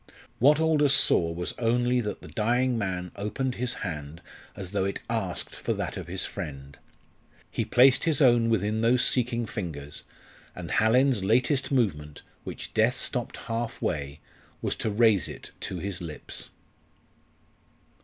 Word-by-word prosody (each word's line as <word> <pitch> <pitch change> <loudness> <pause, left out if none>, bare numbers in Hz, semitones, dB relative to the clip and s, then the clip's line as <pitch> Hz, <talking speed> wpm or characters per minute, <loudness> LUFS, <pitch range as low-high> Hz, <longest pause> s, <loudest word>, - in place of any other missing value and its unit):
What 145 +5 +5
Aldous 150 -3 +4
saw 85 -1 +3
was 85 +1 -3
only 120 +1 +2
that 105 -2 -4
the - - -9
dying 120 +3 +1
man 95 -5 -2
opened 125 +6 -2
his 125 - +1
hand 75 -2 -5 0.4
as 95 -3 -6
though 100 -2 0
it 100 - -2
asked 95 -6 -3
for - - -2
that - - -3
of - - -6
his - - -2
friend. 70 -1 -7 0.8
He 115 - -1
placed 125 +6 +5
his 160 -4 +2
own 120 -4 +5
within 110 0 +1
those 125 +2 +4
seeking 120 -2 +1
fingers, 80 -10 -6 0.5
and - - -6
Hallin's 125 0 +3
latest 130 +7 +2
movement 75 - 0 0.2
which - - -7
death 110 +3 +3
stopped 125 -2 -3
half 115 0 -4
way 70 0 -3 0.4
was - - -1
to - - -1
raise 105 -2 +3
it - - -9
to - - -5
his 100 -3 -4
lips. 80 -3 -7
115 Hz, 150 wpm, -27 LUFS, 90-125 Hz, 0.8 s, What